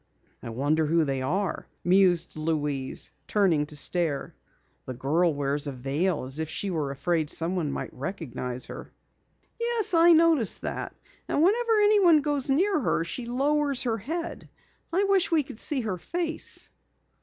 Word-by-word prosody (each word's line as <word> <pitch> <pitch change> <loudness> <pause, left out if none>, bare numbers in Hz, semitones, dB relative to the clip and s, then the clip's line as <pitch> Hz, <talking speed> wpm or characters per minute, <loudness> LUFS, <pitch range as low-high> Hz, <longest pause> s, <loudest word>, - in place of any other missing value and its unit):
"I - - -7
wonder 145 +7 0
who 165 +1 +3
they 135 -3 -2
are?" 180 +7 -2 0.2
mused 175 -1 +3
Louise, 150 -4 -2 0.2
turning 175 -8 +2
to 150 - -4
stare. 155 -1 -1 0.5
"The 130 - -5
girl 160 +7 +1
wears 145 0 -1
a - - -2
veil 140 +7 -1
as 135 +4 -3
if 160 -1 -3
she 195 +4 -3
were 155 -5 -2
afraid 150 +3 -1
someone 165 -2 -1
might - - -5
recognize 130 - -4
her." - - -9 0.7
"Yes, 465 -5 +1
I 335 +1 +7
noticed 320 - +3
that, - - -4 0.3
and 300 - +1
whenever 450 +4 +3
anyone 400 -7 +5
goes 285 -2 -1
near 360 +6 +2
her, 220 - 0
she 235 +8 -5
lowers 280 +2 +1
her 230 -3 -1
head. 330 - -5 0.4
I 370 +4 +2
wish 395 -2 +2
we 320 -3 +2
could 230 - -10
see 285 -4 +1
her 200 -6 -3
face." 335 - -2
185 Hz, 155 wpm, -26 LUFS, -, 0.7 s, I